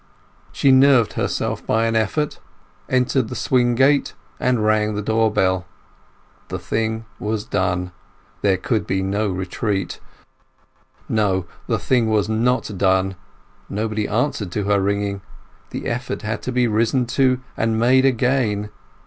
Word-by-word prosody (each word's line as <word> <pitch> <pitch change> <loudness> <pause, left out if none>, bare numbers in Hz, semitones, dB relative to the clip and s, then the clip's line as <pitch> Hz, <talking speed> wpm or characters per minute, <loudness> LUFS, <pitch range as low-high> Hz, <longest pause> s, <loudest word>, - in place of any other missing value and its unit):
She 140 - +3
nerved 130 -3 +5
herself - - -2
by 110 +1 +1
an 115 0 0
effort, 130 +8 0 0.5
entered 130 -1 +1
the - - -5
swing 120 -2 +2
gate, 135 +3 +3 0.2
and 125 -4 +1
rang 110 0 +2
the 105 - -2
door 110 +1 +2
bell. 95 -3 +1 0.8
The - - -4
thing 110 0 -2
was 105 0 -2
done; 90 -2 -1 0.5
there 95 -2 +3
could 110 +4 -1
be 95 0 0
no 100 +3 0
retreat. 95 +1 -2 1.1
No; 95 -4 +1 0.2
the - - +1
thing 120 -4 +1
was 105 -2 +2
not 110 0 0
done. 95 0 +2 0.5
Nobody 105 +1 -2
answered 110 -4 -1
to 105 - -1
her 100 0 +2
ringing. 100 0 -1 0.5
The - - -6
effort 125 +1 -3
had 110 +1 -3
to 130 - -4
be 125 0 +2
risen 115 +3 +1
to 130 +1 +2 0.2
and 110 0 0
made 130 +3 +4
again. 125 -5 +1
110 Hz, 140 wpm, -21 LUFS, 100-125 Hz, 1.1 s, nerved